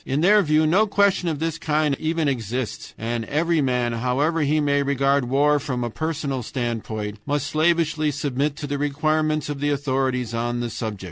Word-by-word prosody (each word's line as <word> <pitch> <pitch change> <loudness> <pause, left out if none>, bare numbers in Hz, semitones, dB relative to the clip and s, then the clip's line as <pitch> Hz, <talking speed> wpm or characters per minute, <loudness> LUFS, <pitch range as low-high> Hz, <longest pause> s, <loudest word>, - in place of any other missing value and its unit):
In 135 +3 -1
their 205 +4 +6
view 155 -2 +3
no 190 +8 +3
question 200 -3 +2
of 155 - -2
this 165 +1 -2
kind 155 -3 +1
even 160 -1 0
exists, 125 -2 -3
and 115 +1 -2
every 165 +3 +1
man, 125 -3 0
however 135 +8 0
he 150 +1 +2
may 145 -1 +2
regard 140 -1 +1
war 145 +4 +3
from 130 -3 -3
a 120 - -3
personal 150 -3 -3
standpoint, 110 -4 -4
must 145 -1 0
slavishly 160 0 +1
submit 140 0 -1
to 145 - -6
the 145 0 -3
requirements 155 +1 0
of 145 -1 -4
the 145 +1 0
authorities 130 -4 -1
on 120 +1 -1
the 120 -1 -3
subject. 110 -3 -4
145 Hz, 185 wpm, -23 LUFS, 125-155 Hz, -, their